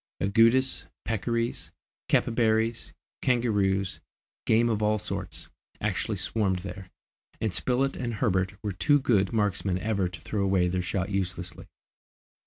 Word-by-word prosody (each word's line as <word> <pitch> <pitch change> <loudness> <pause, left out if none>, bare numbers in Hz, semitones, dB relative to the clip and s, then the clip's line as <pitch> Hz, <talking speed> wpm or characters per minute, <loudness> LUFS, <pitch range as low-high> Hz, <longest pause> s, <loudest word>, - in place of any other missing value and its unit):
Agoutis, 115 +6 +3 0.2
peccaries, 115 +2 -1 0.4
capybaras, 115 -1 +1 0.3
kangaroos, 100 -6 +1 0.5
game 115 +2 +4
of 110 -2 0
all 105 0 +2
sorts, 100 - -5 0.3
actually - - -1
swarmed 100 -4 0
there, 95 0 -7 0.5
and 110 -4 -1
Spilett 130 +5 +1
and 120 -2 -3
Herbert 95 -4 +1
were 105 - -1
too 145 - +3
good 105 -7 +2
marksmen 100 -4 0
ever 100 -2 0
to - - -9
throw 105 - -2
away 95 -2 +3
their 90 +1 0
shot 90 +2 -2
uselessly. 90 -2 -3
105 Hz, 125 wpm, -27 LUFS, 95-115 Hz, 0.5 s, game